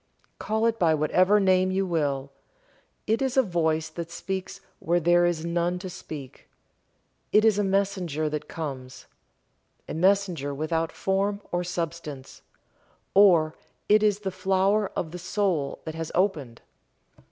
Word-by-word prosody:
Call 220 +1 0
it 230 0 +1
by 160 -3 +4
whatever 185 +7 +3
name 185 -1 +3
you 190 +1 0
will. 140 -6 -1 0.7
It 225 +3 +1
is 265 -1 -1
a 265 - +6
voice 160 -5 0
that 165 +1 -6
speaks 190 +2 -5 0.2
where 175 +2 +1
there 175 +1 +4
is 170 -2 -2
none 170 +1 0
to 185 0 -7
speak, 140 -6 -10 0.8
it 215 +1 +5
is 215 -2 +4
a - - +2
messenger 190 -6 0
that 150 0 -4
comes 135 -5 -7 0.8
a - - -5
messenger 180 -5 +1
without 160 +2 -1
form 200 +1 -1
or 175 0 0
substance 165 -6 -5 0.7
or 175 -6 +5 0.3
it 210 +1 +5
is 210 -1 +2
the 195 -2 -3
flower 195 +2 +1
of 160 - -3
the 180 - -7
soul 180 -6 -1
that 160 - -5
has 165 0 -5
opened. 155 - -1
175 Hz, 145 wpm, -26 LUFS, 155-195 Hz, 0.8 s, a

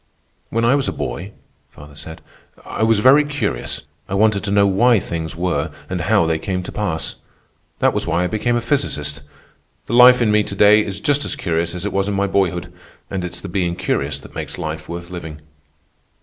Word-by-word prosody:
"When 115 +1 0
I 120 - +4
was 140 -1 +1
a - - 0
boy," 85 +12 -5 0.4
father 75 0 -14
said, 80 +2 -9 0.4
"I - - -5
was 110 0 +4
very 130 +7 +6
curious. 145 - -3 0.3
I 95 - -2
wanted 105 0 +2
to - - -2
know 100 0 +4
why 110 +4 +4
things 80 -2 -5
were 85 -3 -1 0.2
and 90 -2 -2
how 80 +1 +3
they 80 0 0
came 90 0 -3
to - - -7
pass. 95 -7 -3 0.6
That - - +2
was - - -2
why 85 +3 +1
I - - +1
became 110 +4 0
a 120 - 0
physicist. 75 - -1 0.6
The - - -5
life 125 +1 +8
in 115 -3 +2
me 105 0 +4
to 100 - -5
day 105 +2 +6
is 100 -1 -5
just 145 +3 +2
as - - -2
curious 85 0 -1
as 90 +2 -4
it 105 - -3
was 100 0 0
in 100 - -1
my 100 0 +1
boyhood, 90 -3 -1 0.4
and 95 -2 -2
it's 90 - -5
the - - -6
being 85 -2 -1
curious 90 - -1
that - - -14
makes - - -5
life 80 0 -5
worth 85 +1 -7
living." 80 -4 -7
95 Hz, 210 wpm, -20 LUFS, 85-110 Hz, 0.6 s, life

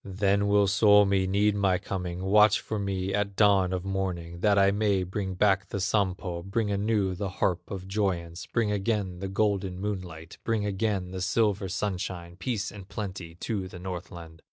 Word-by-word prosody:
Then 100 +1 +1
will 100 0 +4
Suomi 100 -1 +4
need 100 +2 +2
my 95 -2 +2
coming, 90 -2 -4
Watch 105 +2 +5
for 110 - -4
me 95 -1 -2
at 100 -1 -1
dawn 100 -3 +4
of 95 0 -3
morning, 90 -3 -3
That 100 +2 +3
I 100 0 +5
may 100 -2 +1
bring 95 +1 -4
back 95 -1 +2
the 100 - -3
Sampo, 95 -3 -1
Bring 105 +3 -1
anew 100 -1 +1
the 95 +1 -3
harp 90 -1 -1
of 95 -1 -6
joyance, 95 -4 -2
Bring 115 -3 0
again 100 -3 -1
the 95 - -3
golden 100 -2 0
moonlight, 90 -5 -5
Bring 110 -3 0
again 100 -2 -1
the 95 0 -5
silver 100 -1 +1
sunshine, 90 -3 -3
Peace 105 +1 -3
and 100 -2 -11
plenty 95 -4 -6
to 100 -5 -2
the 90 - -10
Northland." 90 -2 -8
95 Hz, 175 wpm, -28 LUFS, 90-105 Hz, -, Watch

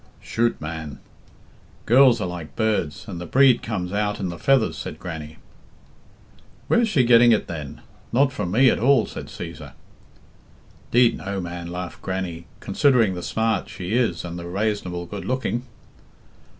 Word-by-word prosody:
"Chut, 115 +1 0
man! 75 -3 -6 0.9
Girls 125 0 +6
are 105 - -1
like 90 -3 -7
birds, 110 -9 -1
and 90 -5 -6
the 90 - -6
breed 130 +3 +5
comes 95 -5 -4
out 105 0 -1
in 95 -3 -2
the 85 -1 -7
feathers," 135 -4 +2
said - - -6
Grannie. 80 -3 -7 1.3
"Where's 235 -1 +3
she 140 -11 +3
getting 120 0 +6
it 110 - +2
then? 75 -4 -7 0.3
Not 135 +2 +3
from 90 - -3
me 125 +7 +5
at - - -1
all," 125 -2 +4
said - - -8
Cæsar. 80 -5 -8 1.2
"Deed, 120 0 +4
no, 100 0 -4
man," 85 -1 -6
laughed 90 0 -6
Grannie, 90 -3 -4
"considering 115 -2 +3
the 90 - -5
smart 110 +1 -1
she 95 +1 -5
is 115 -9 0
and 85 0 -6
the 85 - -7
rasonable 90 -2 -2
good 100 +2 -6
looking." 130 -1 -2
100 Hz, 155 wpm, -23 LUFS, 85-120 Hz, 1.3 s, Girls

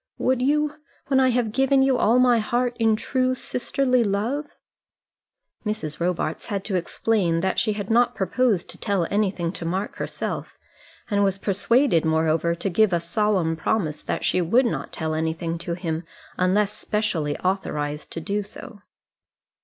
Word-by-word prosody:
Would 255 -1 +1
you 300 +2 +2 0.4
when 265 -1 +4
I 260 -1 +4
have 240 -3 +1
given 270 +2 +3
you 265 -1 +3
all 235 0 +3
my 250 -2 +5
heart 240 +2 0
in 225 -1 +4
true 255 +3 0
sisterly 255 0 0
love?" 225 +9 -1 1.2
Mrs. 210 -9 -3
Robarts 170 -2 -2
had 200 -2 -3
to 200 - -2
explain 180 -1 0
that 190 +1 +1
she 215 - +1
had 205 0 -4
not 240 +1 +3
proposed 205 0 +1
to - - -11
tell 200 -5 0
anything 190 -5 0
to 175 - -8
Mark 185 +5 -3
herself, - - -4 0.5
and 205 0 +3
was 195 -1 +1
persuaded, 205 - +2
moreover, 160 +1 +1
to 170 +3 -3
give 210 +1 +3
a 170 - +3
solemn 170 -1 0
promise 160 -2 -1
that - - -3
she 180 - +2
would 235 +10 +3
not 235 - -2
tell 160 -1 -3
anything 160 +1 -2
to 170 0 -3
him 165 -2 -3 0.3
unless 195 +3 +2
specially 190 -10 -1
authorized 150 -6 -2
to - - -3
do 200 +5 -2
so. 215 +2 -10
200 Hz, 160 wpm, -24 LUFS, 170-240 Hz, 1.2 s, my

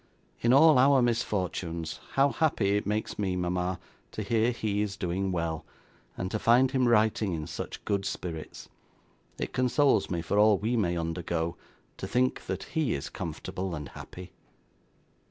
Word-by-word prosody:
'In 120 - +2
all 145 +1 +7
our 135 +1 +6
misfortunes, 90 -9 -1
how 140 +1 +4
happy 110 -11 +1
it 105 - -1
makes 105 +1 -2
me, 95 -3 0
mama, 90 0 -1 0.3
to 110 - -3
hear 115 +3 +2
he 110 -4 -1
is 100 -2 -3
doing 95 +1 -1
well, 85 -3 -2 0.5
and 95 +1 -3
to 110 - -1
find 125 +4 +4
him 130 -2 +2
writing 110 -3 +2
in 80 -2 -3
such - - -7
good 100 -1 0
spirits! 80 -5 -6 0.7
It - - -4
consoles 130 +3 +2
me 85 -2 -2
for 100 +5 +1
all 105 -1 +6
we 110 +5 -1
may 90 -6 +1
undergo, 85 0 -2 0.4
to 95 - -5
think 125 +4 0
that - - -3
he 160 -4 +1
is 70 - -5
comfortable 95 -2 -5
and 75 -2 -6
happy. 90 0 -10
100 Hz, 160 wpm, -28 LUFS, 90-120 Hz, 0.7 s, all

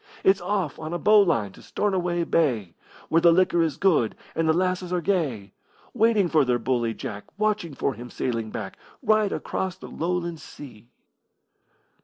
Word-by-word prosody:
It's 190 0 +4
off 180 -5 -2
on 155 +1 -5
a - - 0
bowline 185 - +4
to - - -16
Stornoway 180 -4 -1
Bay, 120 - 0 0.4
Where 165 - +3
the 170 - +7
liquor 175 0 +3
is 160 -4 0
good 155 - +2 0.2
and 160 0 0
the - - +7
lasses 180 +1 0
are 180 - +1
gay, 150 - -1 0.4
Waiting 220 -4 +3
for 155 -3 +3
their 125 -2 +1
bully 120 -2 -1
Jack, 105 0 -6
Watching 210 -7 -1
for 135 - -1
him 120 +2 -9
sailing 115 -4 -3
back, 100 -3 -6 0.2
Right 215 -2 +3
across 190 -1 -3
the - - -10
Lowland 170 -1 -2
Sea. 120 -5 -12
170 Hz, 165 wpm, -25 LUFS, 125-185 Hz, 0.4 s, the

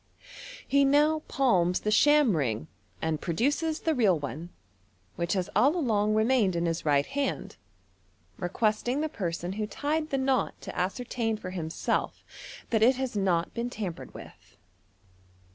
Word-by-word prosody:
He 280 +1 +4
now 295 +3 +4
palms 180 -10 +2
the 210 - -1
sham 290 - +5
ring, 115 - -1 0.4
and 160 -2 -1
produces 290 - 0
the 320 - +1
real 210 - +3
one, 150 +4 -6 0.7
which 170 0 -1
has 185 -3 -1
all 285 +6 +4
along 215 -9 +1
re 220 - +3
naained 220 -7 +2
in 170 0 0
his 165 -1 -2
right 145 -2 +2
hand, 280 0 -3 0.8
requesting 215 +8 0
the 315 - -1
person 175 - -4
who 210 +1 -3
tied 305 +6 -2
the 275 - 0
knot 265 -1 0
to - - -8
ascertain 225 +3 -2
for 185 -3 -7
himself 165 -3 -2 0.5
that 220 -2 +2
it 250 +4 +5
has 260 -3 -3
not 180 -4 0
been 235 +1 -3
tampered 200 -8 -6
with. - - -13
215 Hz, 150 wpm, -28 LUFS, 175-270 Hz, 0.8 s, sham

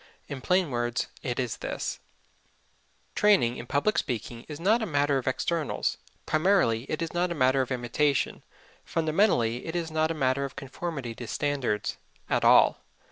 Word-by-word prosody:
In 135 -2 -6
plain 180 0 +2
words 120 -1 -1
it 125 0 -3
is 125 -3 -2
this: - - -4 1.1
Training 200 - +3
in 120 - -8
public 145 - +1
speaking 120 -2 -4
is 150 -1 -7
not 215 +7 +3
a 220 - -1
matter 145 -3 +2
of 130 - -8
externals 155 +4 -1 0.3
primarily; 155 - +2
it 155 +2 -1
is 165 - -5
not 175 0 0
a - - -2
matter 130 -1 +3
of 130 - -3
imitation 130 +3 0 0.4
fundamentally; 155 - +1
it 160 - -5
is 165 -2 -2
not 155 0 +1
a 165 - -2
matter 135 -1 +1
of 140 - -5
conformity 135 -3 -5
to 120 +1 -8
standards 135 -8 -1 0.3
at - - +2
all. - - +6
145 Hz, 165 wpm, -27 LUFS, 125-165 Hz, 1.1 s, all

